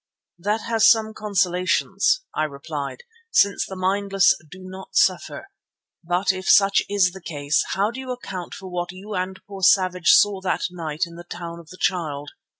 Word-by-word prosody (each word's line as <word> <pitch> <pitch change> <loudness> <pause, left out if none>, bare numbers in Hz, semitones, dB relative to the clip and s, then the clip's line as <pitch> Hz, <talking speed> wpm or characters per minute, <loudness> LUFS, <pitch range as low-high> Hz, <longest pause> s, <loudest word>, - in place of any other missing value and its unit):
"That 210 +5 -1
has 225 -1 +4
some 220 -1 +3
consolations," 190 - +1
I 155 - 0
replied, 145 - -6 0.3
"since 200 - +3
the 190 - -7
mindless 195 +1 +2 0.2
do 185 +4 -12
not 190 +1 -10
suffer. 390 - +1 0.5
But 180 +3 +1
if 185 0 -5
such 200 0 +6
is 200 -3 +3
the 190 +1 -11
case, 145 -3 0
how 200 +3 +1
do 245 - -8
you 260 -1 -5
account 190 -8 -6
for 190 - -9
what 175 0 -3
you 195 +3 -9
and 185 0 -3
poor 195 -1 -9
Savage 185 -2 +3
saw 200 -2 +5
that 185 -1 -1
night 160 -3 -4
in 170 0 -12
the 175 - -9
Town 170 -1 -7
of 165 -2 -15
the 185 - -12
Child? 150 -6 -2
185 Hz, 175 wpm, -23 LUFS, 175-200 Hz, 0.5 s, such